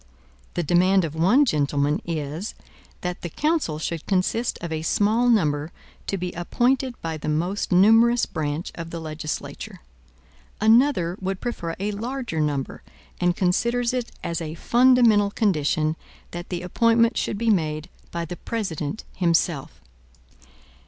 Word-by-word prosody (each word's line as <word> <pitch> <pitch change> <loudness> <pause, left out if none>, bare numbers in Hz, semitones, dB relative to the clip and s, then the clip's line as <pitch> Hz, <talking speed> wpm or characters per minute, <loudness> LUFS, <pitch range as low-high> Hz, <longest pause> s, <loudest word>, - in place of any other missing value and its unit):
The 175 - 0
demand 180 +3 +3
of 155 - -5
one 195 - +4
gentleman 145 - +1
is, 160 +4 -4 0.5
that 180 0 -4
the 175 - -4
council 300 - 0
should 160 0 -4
consist 200 +5 0
of 170 -1 -6
a 160 -1 -2
small 215 +8 +2
number 155 -8 +2 0.4
to 195 - -1
be 180 -1 -3
appointed 245 +8 0
by 160 -1 -3
the 155 - -4
most 175 +8 -1
numerous 225 +6 +5
branch 150 +2 -3
of 165 -1 -7
the 170 - -5
legislature. 155 -1 -6 0.8
Another 220 -5 +3
would 190 0 -2
prefer 170 -9 -4
a 205 +2 -1
larger 235 -3 -4
number, 145 -3 -2 0.4
and 175 -1 +2
considers 235 +7 +1
it 250 -2 -2
as 170 0 -2
a 160 -1 -5
fundamental 235 -2 +4
condition 155 -6 +1 0.4
that 175 0 -7
the 180 -1 -4
appointment 230 +5 +3
should - - -1
be 230 +1 +2
made 155 -5 0 0.2
by 170 0 -3
the 175 +2 -7
President 195 -5 -4
himself. 170 -4 0
180 Hz, 140 wpm, -24 LUFS, 160-230 Hz, 0.8 s, numerous